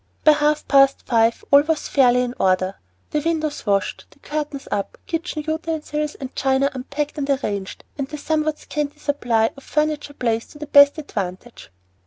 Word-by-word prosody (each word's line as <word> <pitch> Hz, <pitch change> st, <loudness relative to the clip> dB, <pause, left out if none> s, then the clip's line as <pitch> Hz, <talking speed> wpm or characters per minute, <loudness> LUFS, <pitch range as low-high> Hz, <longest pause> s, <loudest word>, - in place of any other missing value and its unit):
By 310 Hz, -, +8 dB
half 300 Hz, 0 st, +1 dB
past 275 Hz, -1 st, +4 dB
five 230 Hz, -1 st, +2 dB
all 280 Hz, 0 st, +8 dB
was 310 Hz, 0 st, -1 dB
fairly 250 Hz, -2 st, +4 dB
in 245 Hz, -1 st, -3 dB
order, 185 Hz, 0 st, +2 dB, 0.4 s
the 300 Hz, -, +1 dB
windows 310 Hz, -5 st, -2 dB
washed, 200 Hz, -1 st, 0 dB
the -, -, -23 dB
curtains 290 Hz, -1 st, -5 dB
up, 200 Hz, -1 st, -2 dB
kitchen 330 Hz, -2 st, -3 dB
utensils 315 Hz, -2 st, -2 dB
and 265 Hz, -1 st, -8 dB
china 270 Hz, +1 st, +2 dB
unpacked 285 Hz, +3 st, -4 dB
and 280 Hz, 0 st, -3 dB
arranged, 205 Hz, -8 st, -2 dB, 0.2 s
and 270 Hz, -, -1 dB
the 300 Hz, -, -7 dB
somewhat 305 Hz, 0 st, -1 dB
scanty 295 Hz, 0 st, -4 dB
supply 245 Hz, -7 st, +1 dB
of 275 Hz, -, -14 dB
furniture 300 Hz, -1 st, -1 dB
placed 230 Hz, -3 st, -2 dB
to -, -, -13 dB
the 300 Hz, -, -6 dB
best 285 Hz, 0 st, +6 dB
advantage. 205 Hz, -, -6 dB
285 Hz, 170 wpm, -22 LUFS, 245-300 Hz, 0.4 s, By